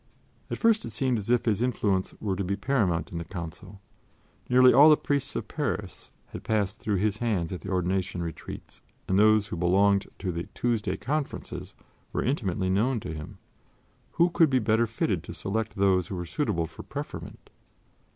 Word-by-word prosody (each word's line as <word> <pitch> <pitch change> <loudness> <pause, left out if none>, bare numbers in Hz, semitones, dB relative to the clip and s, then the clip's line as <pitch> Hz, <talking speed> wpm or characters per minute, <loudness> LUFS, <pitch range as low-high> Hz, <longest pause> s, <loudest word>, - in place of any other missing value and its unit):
At - - -3
first 225 -2 +3
it - - -5
seemed 120 +2 0
as 100 - -7
if 120 -1 +3
his 110 -2 +1
influence 105 -6 0
were 100 -3 -1
to 100 - -2
be 95 +2 -1
paramount 100 -7 0
in 85 - -4
the - - -4
Council. 90 +3 -8 0.7
Nearly 125 0 +7
all 145 +5 +8
the 150 - +7
priests 140 -2 -1
of - - -3
Paris - - -4 0.2
had - - -8
passed 105 -2 0
through 105 - -1
his 105 +2 0
hands 100 -8 -1
at 90 - -6
the 100 - -7
ordination 90 -1 -1
retreats 80 -3 -8 0.3
and 95 +1 +2
those 105 -1 +4
who - - -4
belonged 100 +3 +3
to 95 - -3
the 85 0 -4
"Tuesday 110 -6 0
Conferences" 150 +2 -4 0.4
were - - 0
intimately 95 -8 0
known 115 +6 +2
to 80 - -5
him. 75 -1 -8 0.8
Who 170 +1 +3
could 165 -2 +4
be 130 - +3
better 115 0 +2
fitted 105 -5 -1
to - - -7
select 110 +2 -2
those 95 -3 +2
who 95 - -5
were 90 -1 -4
suitable 90 - -1
for - - -10
preferment? - - -8
100 Hz, 185 wpm, -27 LUFS, 95-120 Hz, 0.8 s, all